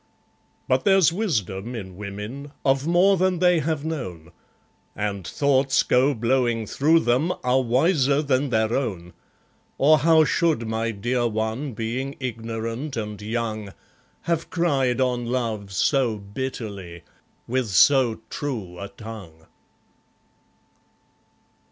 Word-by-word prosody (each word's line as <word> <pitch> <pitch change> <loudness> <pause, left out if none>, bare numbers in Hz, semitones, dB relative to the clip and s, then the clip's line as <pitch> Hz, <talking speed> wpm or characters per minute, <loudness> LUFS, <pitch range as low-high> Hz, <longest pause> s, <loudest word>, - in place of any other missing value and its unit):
But 130 0 +2
there's 195 -4 +4
wisdom 120 - -2
in 95 -5 -7
women, 105 +9 -7
of 135 +2 +2
more 185 +3 +4
than 185 0 +1
they 180 -1 +4
have 155 0 -2
known, 90 - -5 0.6
And 100 -3 -3
thoughts 135 -1 +2
go 135 +3 +3
blowing 120 -1 +1
through 160 +9 +3
them, 130 +9 +1
are 125 +1 +3
wiser 140 +3 +2
than 140 0 +1
their 110 -1 +1
own, 95 -10 -3 0.6
Or 155 +3 +5
how 160 +1 +5
should 160 -11 +1
my 110 +1 -1
dear 120 +3 -1
one, 110 +5 -3
being 125 +5 -3
ignorant 115 +2 -4
and 105 -1 -5
young, 110 -2 -4 0.5
Have 165 -1 -2
cried 135 -8 +1
on 125 -2 0
love 115 -5 -2
so 120 +3 +1
bitterly, 100 -5 -6 0.4
with 130 0 0
so 115 +3 +4
true 105 -12 -5
a 100 - -5
tongue? 100 -8 -11
125 Hz, 120 wpm, -24 LUFS, 110-140 Hz, 0.6 s, Or